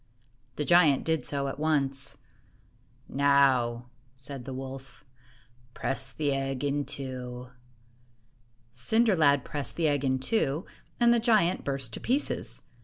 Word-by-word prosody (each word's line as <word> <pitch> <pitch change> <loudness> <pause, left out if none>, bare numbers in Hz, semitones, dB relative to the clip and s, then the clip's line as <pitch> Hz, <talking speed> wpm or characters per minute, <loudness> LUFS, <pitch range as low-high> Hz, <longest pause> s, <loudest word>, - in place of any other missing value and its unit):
The 150 - -2
giant 165 -5 +5
did 160 -1 0
so 140 -1 -1
at 135 - -5
once. 140 -4 0 0.9
"Now," 135 -4 +3 0.3
said 130 -1 -8
the 135 - -6
wolf, 135 +1 -9 0.7
"press 135 0 -1
the 145 -2 -1
egg 135 0 -2
in 145 0 0
two." 125 -2 -6 1.2
Cinder 215 - +2
lad 145 -5 +3
pressed 145 -2 -4
the 165 -2 +1
egg 145 -2 +1
in 130 -1 +1
two, 145 +1 0 0.3
and 235 0 +5
the 240 - +3
giant 215 -6 +2
burst 135 -5 -3
to - - -2
pieces. 275 +4 -1
140 Hz, 130 wpm, -28 LUFS, 130-155 Hz, 1.2 s, giant